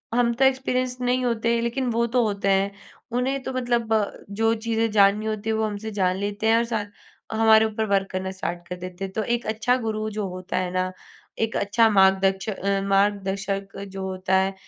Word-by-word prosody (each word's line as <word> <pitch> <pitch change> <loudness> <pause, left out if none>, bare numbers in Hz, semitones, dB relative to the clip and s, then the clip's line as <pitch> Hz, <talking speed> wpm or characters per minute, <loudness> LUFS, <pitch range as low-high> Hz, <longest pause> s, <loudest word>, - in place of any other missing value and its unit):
हम 235 -1 +3
तो 265 +3 +3
एक्सपेरिएंस्ड 255 -1 0
नहीं 250 +1 +1
होते, 235 0 +1
लेकिन 245 +2 -1
वो 235 +1 +1
तो 245 +1 +2
होते 200 -1 -1
हैं, 195 +1 +2 0.4
उन्हें 260 +3 0
तो 265 - -4
मतलब 240 -3 0 0.3
जो 225 +3 +1
चीजें 225 0 +1
जाननी 205 +1 +4
होती 215 0 -3
है 220 - +1
वो 220 0 +1
हमसे 215 +1 -4
जान 185 -3 +1
लेते 205 +2 -2
हैं 225 +1 +5
और 230 - +2
साथ 220 -3 -2 0.5
हमारे 220 0 +5
ऊपर 220 0 -1
वर्क 195 -1 +1
करना 190 0 -3
स्टार्ट 175 -2 -5
कर 180 - -4
देते 180 +1 -7
हैं। 190 - -7
तो 220 - -1
एक 240 +2 -1
अच्छा 220 +3 +1
गुरु 215 -2 -2
जो 210 -1 -3
होता 185 0 -5
है 185 -1 -1
ना, 185 0 -1 0.5
एक 225 0 -1
अच्छा 225 +3 +3
मार्गदच्चा 195 0 +2
मार्गदर्शक 195 0 0
जो 195 0 -6
होता 185 0 -1
है, 190 +1 +1
215 Hz, 195 wpm, -24 LUFS, 195-230 Hz, 0.5 s, हैं